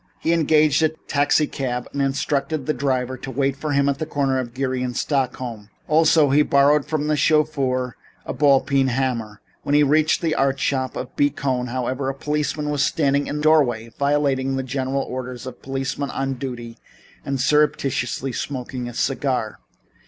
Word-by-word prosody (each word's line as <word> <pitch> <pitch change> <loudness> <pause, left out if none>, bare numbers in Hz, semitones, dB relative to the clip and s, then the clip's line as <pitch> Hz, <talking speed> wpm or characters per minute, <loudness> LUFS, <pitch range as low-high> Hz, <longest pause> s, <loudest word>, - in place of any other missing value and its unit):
He 165 - 0
engaged 155 -2 +3
a 160 - +4
taxicab 145 -4 -1
and 140 - -1
instructed 140 +1 -1
the 155 - 0
driver 130 -1 -1
to 135 - -7
wait 135 +1 0
for 150 +1 -3
him 140 0 +2
at 140 -1 0
the 155 - -3
corner 135 -3 0
of 120 -2 -4
Geary 130 -1 -1
and 125 -1 -3
Stockton 135 -4 0 0.3
Streets. 105 - -30
Also, 155 -2 +4
he 145 +2 +5
borrowed 145 0 +3
from 155 -2 -1
the 150 0 +1
chauffeur 140 -5 +1 0.3
a - - -4
ball 140 0 +4
peen 135 -2 +1
hammer. 120 -5 -2 0.2
When 145 - 0
he 150 - +6
reached 155 +2 +3
the 160 -2 +1
art 135 0 +1
shop 130 -1 -1
of 125 - -6
B. 145 - +3
Cohn, 130 -3 -2
however, 130 +2 -2
a 135 - -4
policeman 150 +1 -2
was 145 -2 0
standing 140 -1 +1
in - - -3
the 150 - -3
doorway, 125 -8 +3
violating 140 -2 +1
the 135 - -2
general 130 +1 -2
orders 125 -1 -6
of 130 - -6
a - - -28
policeman 135 +1 -3
on 135 0 -2
duty 120 -3 -7 0.4
by 140 - -2
surreptitiously 135 -2 +1
smoking 125 -1 -4
a 120 - -10
cigar. 130 -5 -1
135 Hz, 180 wpm, -22 LUFS, 130-145 Hz, 0.4 s, he